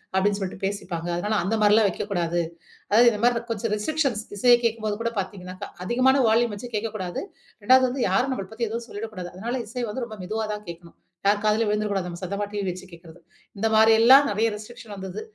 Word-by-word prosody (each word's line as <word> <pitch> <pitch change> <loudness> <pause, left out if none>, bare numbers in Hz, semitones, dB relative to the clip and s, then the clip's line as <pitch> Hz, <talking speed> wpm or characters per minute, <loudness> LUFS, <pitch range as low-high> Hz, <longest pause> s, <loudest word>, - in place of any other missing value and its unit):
அப்டின்னு 200 +1 +2
சொல்ட்டு 185 -1 -5
பேசிப்பாங்க. 175 -4 -4
அதனால 210 +3 0
அந்த 220 +3 0
மாரிலாம் 210 0 +5
வைக்கக்கூடாது. 175 -3 -1 0.5
அதாவது 235 +3 +7
இந்த 210 -1 -4
மாரி 240 -1 +2
கொஞ்சம் 215 0 -2
ரெஸ்ட்ரிக்க்ஷன்ஸ் 245 -1 -1
இசையை 240 +3 +6
கேக்கும்போது 220 -2 -1
கூட 230 - 0
பாத்தீங்கனாக்கா. 185 -1 -6 0.2
அதிகமான 255 +5 +3
வால்யூம் 230 -1 +2
வச்சு 240 +4 -8
கேக்கக்கூடாது. 205 -5 -4 0.4
2வது 255 +3 +6
வந்து 255 0 -2
யாரும் 250 +8 +2
நம்மள 195 -7 -5
பத்தி 230 0 -2
எதுவும் 235 +1 -4
சொல்லிடக்கூடாது. 205 -4 -6
அதனால 235 +6 -3
இசை 240 +1 -3
வந்து 240 +3 -3
ரொம்ப 215 -2 -9
மெதுவா 220 +3 -2
தான் 210 0 -11
கேக்கணும். 170 0 -11 0.3
யார் 205 +1 +4
காதுலயும் 215 +1 +2
விழுந்துரக்கூடாது, 210 -3 -1
நம்ம 175 0 -7
சத்தமா 200 +3 -3
டிவி 205 -1 -3
வச்சு 185 +1 -6
கேக்கிறது. 170 0 -14 0.4
இந்த 225 +3 +1
மாரியெல்லாம் 225 +6 +7
நெறையா 220 +2 +1
ரெஸ்ட்ரிக்க்ஷன் 215 0 -10
வந்தது. 190 +1 -6
210 Hz, 185 wpm, -24 LUFS, 190-230 Hz, 0.5 s, அதாவது